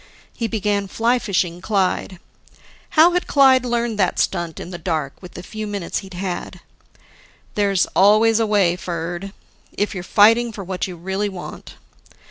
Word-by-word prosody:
He 230 - -2
began 205 -2 -1
fly 235 +5 +1
fishing 180 -6 -1
Clyde: 190 -2 -1 0.8
How 330 +3 +8
had 360 0 -1
Clyde 265 -2 +5
figured 235 -2 -1
that 190 -3 +1
stunt, 170 -3 -1
in 175 - -8
the 175 - -7
dark, 155 -5 -2
with 180 - -11
the 180 - -8
few 215 +3 -6
minutes 200 -4 -3
he'd 190 -2 -11
had? 180 -1 -5 0.9
"There's 200 -3 +2
always 215 +3 +5
a 225 - +1
way, 195 -5 +3
Ferd, 175 +2 -5 0.4
if 205 - -1
you're 185 - -5
fighting 230 +5 +4
for 205 -2 -7
what 185 0 -3
you 180 - -7
really 190 +4 -2
want." 185 -3 -9
200 Hz, 160 wpm, -21 LUFS, 180-220 Hz, 0.9 s, How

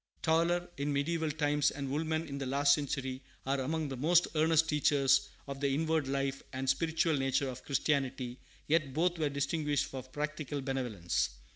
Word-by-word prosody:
Tauler 170 +2 +2
in 140 +1 -1
mediaeval 160 +3 0
times 145 -1 +2
and 140 -2 -5
Woolman 160 +2 -1
in 140 -1 -5
the 135 - -3
last 140 +2 +4
century 135 -3 -2 0.2
are 135 +1 0
among 155 +4 -1
the 135 - -4
most 165 +7 +4
earnest 160 0 +3
teachers 140 -3 +3 0.2
of 140 -1 -6
the 140 -1 +1
inward 160 -1 +1
life 135 0 -1
and 130 +1 -3
spiritual 165 +2 +2
nature 135 +1 +1
of 125 0 -8
Christianity, 135 -3 -1 0.3
yet 150 -4 +1
both 175 +2 +1
were 150 -2 +1
distinguished 145 0 0
for 135 -2 -6
practical 145 +2 -4
benevolence. 110 - -1
145 Hz, 165 wpm, -32 LUFS, 135-160 Hz, 0.3 s, last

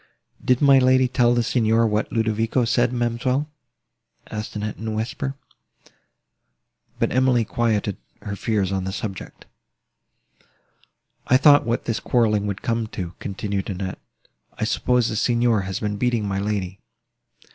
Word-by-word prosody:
"Did 125 +2 +2
my 140 -1 +7
lady 130 0 +4
tell 120 -1 +2
the 120 - +2
Signor 115 -1 +2
what 105 -1 -1
Ludovico 115 +2 0
said, 120 +1 +2
ma'amselle?" 125 +4 -1 0.8
asked 105 0 -5
Annette 105 0 -4
in 110 - -6
a - - -1
whisper; 125 +5 -3 1.6
but - - 0
Emily 125 -2 +3
quieted 105 -3 -1 0.3
her 100 - -4
fears 100 -2 -1
on 95 -1 -2
the 95 - -3
subject. 95 -1 -7 1.8
"I 130 - +5
thought 145 -1 +6
what 120 +1 -1
this 115 - -1
quarrelling 105 -4 +1
would 100 -1 -4
come 115 -1 -1
to," 90 -5 -6
continued 100 0 -4
Annette: 95 -1 -4 0.6
"I - - -2
suppose 125 -2 +1
the 110 - -3
Signor 120 -1 +2
has 95 - -3
been 105 -1 -2
beating 120 -2 0
my 95 0 -1
lady." 100 -2 -3
115 Hz, 145 wpm, -23 LUFS, 105-120 Hz, 1.8 s, my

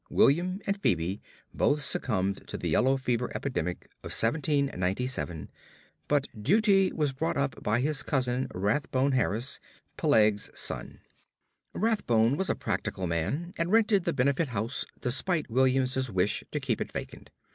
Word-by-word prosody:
William 180 +7 +3
and 200 0 -1
Phebe 90 - 0 0.3
both 145 0 +1
succumbed 100 -7 -1
to - - -5
the - - -3
yellow 135 +2 +3
fever 125 -2 -1
epidemic 90 - -3 0.2
of - - -6
1797, 125 - 0 0.6
but 145 -1 +2
Dutee 195 - +3
was 150 -3 0
brought 160 +4 -1
up 140 -1 -1
by 110 +3 +1
his 150 +1 0
cousin 130 -2 0
Rathbone 130 +7 0
Harris, 125 0 0 0.4
Peleg's 105 -1 +3
son. - - -3 0.7
Rathbone 135 - +2
was 190 +5 -1
a - - +2
practical 95 - -3
man, 110 - -2
and 165 +2 0
rented 215 -4 +4
the 170 - +2
Benefit 140 +5 +1
Street 125 - -10
house 110 +5 -1
despite 140 +3 -1
William's 130 +1 +2
wish 95 0 0
to 150 - -2
keep 135 -5 -1
it - - -3
vacant. - - -7
130 Hz, 145 wpm, -29 LUFS, 110-150 Hz, 0.7 s, rented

